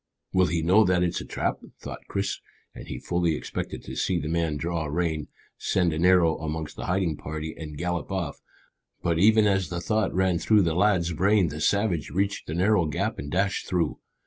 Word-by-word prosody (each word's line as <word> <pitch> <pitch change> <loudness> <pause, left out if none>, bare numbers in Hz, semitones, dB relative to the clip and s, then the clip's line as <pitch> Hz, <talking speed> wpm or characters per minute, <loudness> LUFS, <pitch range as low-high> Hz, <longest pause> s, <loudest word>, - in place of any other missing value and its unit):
"Will 95 -1 +4
he 85 -2 -1
know 95 +6 +5
that 90 -2 +2
it 90 - +2
is 85 - -4
a - - -8
trap?" - - -2 0.2
thought - - -9
Chris, 100 0 -2 0.3
and - - -10
he - - -5
fully 85 -2 0
expected - - -5
to - - -7
see 90 - 0
the 75 - -4
man 80 -2 0
draw 85 +1 -2
rein, 80 0 -1 0.3
send 90 -4 +1
an 80 +3 0
arrow 90 -3 +4
amongst 80 -1 -4
the - - -6
hiding 90 -4 0
party, 80 +1 -5
and 75 -2 -8
gallop 85 +1 -3
off. 90 -7 -3 0.6
But 85 -1 +1
even 110 +3 +5
as 95 -4 +1
the 90 -1 -3
thought 110 +3 0
ran 95 -2 +1
through 105 +4 +4
the 85 -2 +1
lad's 90 -2 +2
brain 95 +1 +3
the 75 +2 -6
savage 100 -3 +1
reached 100 +1 -1
the 80 - -3
narrow 95 -1 +3
gap 75 - -2
and 70 - -5
dashed 95 +4 0
through. 85 -4 0
85 Hz, 205 wpm, -26 LUFS, 80-95 Hz, 0.6 s, know